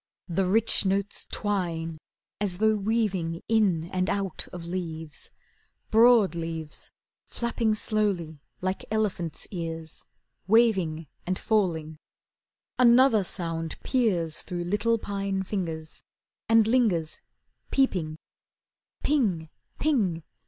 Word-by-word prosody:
The 185 +2 0
rich 220 +5 +3
notes 195 +1 -1
twine 170 -6 -2 0.4
As 195 -4 0
though 220 +2 +4
weaving 200 -6 -1
in 205 -8 +3
and 185 0 +1
out 195 -3 -2
of 175 -2 -7
leaves, 165 -3 -5 0.6
Broad 225 -3 +6
leaves 165 -2 -4 0.4
Flapping 235 -2 0
slowly 195 -9 -1 0.2
like 185 +1 -2
elephants' 200 -7 -1
ears, 165 -3 -6 0.4
Waving 190 -8 +3 0.2
and 185 0 0
falling. 165 -8 0 0.8
Another 240 -3 +6
sound 165 -3 -3
peers 185 - +1
Through 175 -1 -4
little 210 +6 +1
pine 195 -2 -2
fingers, 165 -5 -4 0.5
And 225 -1 +6
lingers, 215 -10 +1 0.5
peeping. 180 - +1 0.9
Ping! 195 - +1
190 Hz, 95 wpm, -27 LUFS, 165-220 Hz, 0.9 s, Broad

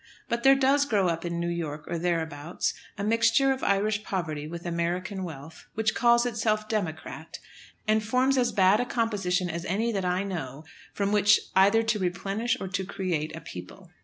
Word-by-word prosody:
But 235 0 -1
there 270 +2 +7
does 275 +1 +3
grow 200 -8 +2
up 165 0 -3
in 170 0 -2
New 170 - -1
York, 160 -3 -3
or 170 - -3
thereabouts, 165 -2 -2 0.2
a 200 - -3
mixture 230 +5 +3
of 265 - -2
Irish 205 +1 +1
poverty 155 -7 -3
with 170 +2 -7
American 175 +3 -2
wealth, 160 -2 -9
which 220 0 +1
calls 235 0 +4
itself 215 -2 0
"Democrat," 180 -8 -4 0.5
and 215 0 +3
forms 255 +5 +2
as 245 -2 +2
bad 195 0 +4
a 245 - 0
composition 200 -7 0
as 170 0 -4
any 215 +6 0
that 195 -3 -2
I 180 +1 0
know 155 -7 -5 0.3
from 200 0 -1
which 210 0 +5 0.2
either 200 +4 +5
to 225 -1 0
replenish 195 +5 -1
or 190 - -4
to 190 +1 -2
create 175 -5 -3
a 165 - -8
people. 90 0 -10
195 Hz, 185 wpm, -27 LUFS, 170-220 Hz, 0.5 s, there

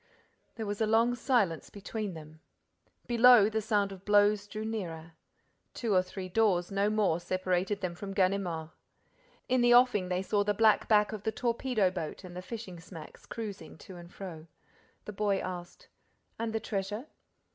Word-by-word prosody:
There 220 - -4
was 205 +1 -4
a 220 - +3
long 230 +2 +3
silence 230 - 0
between 205 -1 -5
them. 155 0 -11 0.7
Below, 240 -3 +6
the 220 0 -1
sound 205 -2 +1
of 190 -1 -10
blows 205 0 +3
drew 215 +1 -5
nearer. 170 -7 -5 0.6
Two 230 -4 -1
or 185 - +5
three 185 0 -7
doors, 185 -3 +1
no 200 +1 +1
more, 210 -6 +1
separated 185 +2 -1
them 180 -2 -2
from 195 +3 -7
Ganimard. 185 -4 0 0.8
In 255 -1 +2
the 240 0 +6
offing, 240 -7 +4
they 180 +1 -1
saw 205 +1 +1
the 205 0 0
black 220 0 +4
back 210 -2 +4
of 215 -2 -6
the 220 - -1
torpedo 235 -4 0
boat 175 -1 -5
and 180 -1 -10
the 180 - -5
fishing 190 -3 -8
smacks 165 -2 -12
cruising 205 -9 -7
to 185 +3 -12
and 175 0 -12
fro. 170 -5 -9 0.6
The 210 - -7
boy 200 -1 +1
asked: 180 -2 -7 0.5
"And 230 0 -2
the 225 - -1
treasure?" 210 +3 -4
200 Hz, 170 wpm, -30 LUFS, 185-220 Hz, 0.8 s, Below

